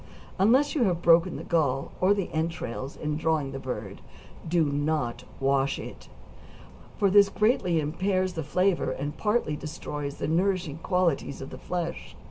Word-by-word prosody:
Unless 255 +9 +4
you 265 -7 +2
have 175 -3 0
broken 170 +1 +5
the - - -6
gall, 140 -5 0
or 190 +3 +5
the 195 -3 -3
entrails, 160 -5 -3
in 150 0 -2
drawing 155 -3 0
the 135 - -5
bird 105 -7 -6 0.5
do 165 -1 +2
not 145 -3 -1
wash 135 0 +1
it, - - -9 0.9
for 200 -2 +3
this 200 0 +7
greatly 200 -7 +2
impairs 185 +5 0
the 165 - -3
flavor, 180 +5 +1
and 145 +2 -4
partly 210 -8 0
destroys 150 -2 -5
the - - -2
nourishing 175 -2 0
qualities 175 -6 0
of 135 - -8
the - - -8
flesh. 175 -2 -4
165 Hz, 155 wpm, -27 LUFS, 145-185 Hz, 0.9 s, this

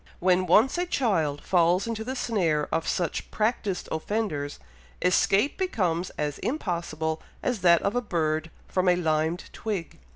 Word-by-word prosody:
When 185 0 +3
once 230 - +4
a 355 - 0
child 165 - 0
falls 180 +1 +3
into 225 -1 -3
the 260 +3 -4
snare 175 - 0
of 165 0 0
such 175 -4 -1
practised 210 -4 -1
offenders, 160 -5 -2 0.4
escape 195 - +2
becomes 185 - 0
as 150 -1 -2
impossible 170 - -2 0.2
as 245 -4 0
that 170 -1 +5
of 200 - 0
a 245 - +2
bird 160 -6 -1 0.2
from 185 -1 +1
a 180 - +5
limed 160 0 0
twig." 200 -7 -4
180 Hz, 150 wpm, -26 LUFS, 160-220 Hz, 0.4 s, that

